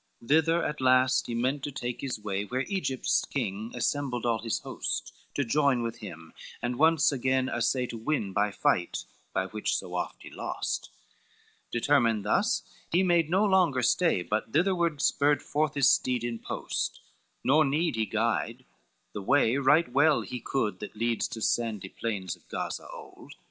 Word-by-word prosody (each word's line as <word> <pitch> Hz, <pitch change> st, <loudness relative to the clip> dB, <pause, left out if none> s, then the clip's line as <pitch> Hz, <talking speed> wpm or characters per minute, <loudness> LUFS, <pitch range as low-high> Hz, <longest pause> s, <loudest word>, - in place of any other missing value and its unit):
IV 115 Hz, -, -16 dB
Thither 160 Hz, +3 st, +4 dB
at 150 Hz, -2 st, -3 dB
last 130 Hz, 0 st, +4 dB
he 120 Hz, -, -3 dB
meant 130 Hz, +4 st, 0 dB
to 145 Hz, -, -4 dB
take 125 Hz, -3 st, -4 dB
his 130 Hz, -5 st, -3 dB
way, 100 Hz, -1 st, -2 dB
Where 125 Hz, +5 st, -2 dB
Egypt's 185 Hz, -10 st, 0 dB
king 110 Hz, -3 st, -3 dB
assembled 125 Hz, 0 st, -1 dB
all 115 Hz, -2 st, +1 dB
his 115 Hz, -1 st, -2 dB
host, -, -, -4 dB, 0.2 s
To 140 Hz, -, +1 dB
join 135 Hz, -1 st, +2 dB
with 115 Hz, 0 st, -4 dB
him, 85 Hz, -7 st, -10 dB, 0.3 s
and 120 Hz, 0 st, -2 dB
once 160 Hz, -2 st, +5 dB
again 130 Hz, -1 st, +1 dB
assay 125 Hz, +2 st, 0 dB
To 115 Hz, -2 st, -7 dB
win 110 Hz, -6 st, -1 dB
by 105 Hz, +2 st, +2 dB
fight, 90 Hz, -3 st, 0 dB, 0.3 s
by 95 Hz, -, 0 dB
which 105 Hz, +3 st, -2 dB
so -, -, -4 dB
oft -, -, -4 dB
he -, -, -10 dB
lost: -, -, -3 dB, 0.8 s
Determined 120 Hz, -4 st, +2 dB
thus, 105 Hz, -, +2 dB, 0.3 s
he 180 Hz, +3 st, +3 dB
made 170 Hz, -3 st, +3 dB
no 190 Hz, +5 st, +3 dB
longer 180 Hz, -10 st, +3 dB
stay, 125 Hz, -, +2 dB
But 105 Hz, +4 st, -2 dB
thitherward 170 Hz, -3 st, +1 dB
spurred 145 Hz, +1 st, +3 dB
forth 150 Hz, 0 st, 0 dB
his 140 Hz, -1 st, +5 dB
steed 125 Hz, -2 st, +1 dB
in 120 Hz, -1 st, -3 dB
post, -, -, -3 dB, 0.4 s
Nor 150 Hz, +4 st, +5 dB
need 150 Hz, +2 st, +1 dB
he 110 Hz, -1 st, 0 dB
guide, 115 Hz, +2 st, -1 dB, 0.5 s
the 105 Hz, -, -4 dB
way 125 Hz, +2 st, +3 dB
right 145 Hz, +5 st, +4 dB
well 145 Hz, +2 st, +4 dB
he 125 Hz, -, -6 dB
could, 105 Hz, -6 st, -2 dB
That 105 Hz, -, -8 dB
leads 115 Hz, +1 st, 0 dB
to 110 Hz, -, -7 dB
sandy 110 Hz, -5 st, 0 dB
plains 95 Hz, -6 st, -3 dB
of -, -, -27 dB
Gaza -, -, -4 dB
old. -, -, -12 dB
125 Hz, 175 wpm, -28 LUFS, 110-145 Hz, 0.8 s, once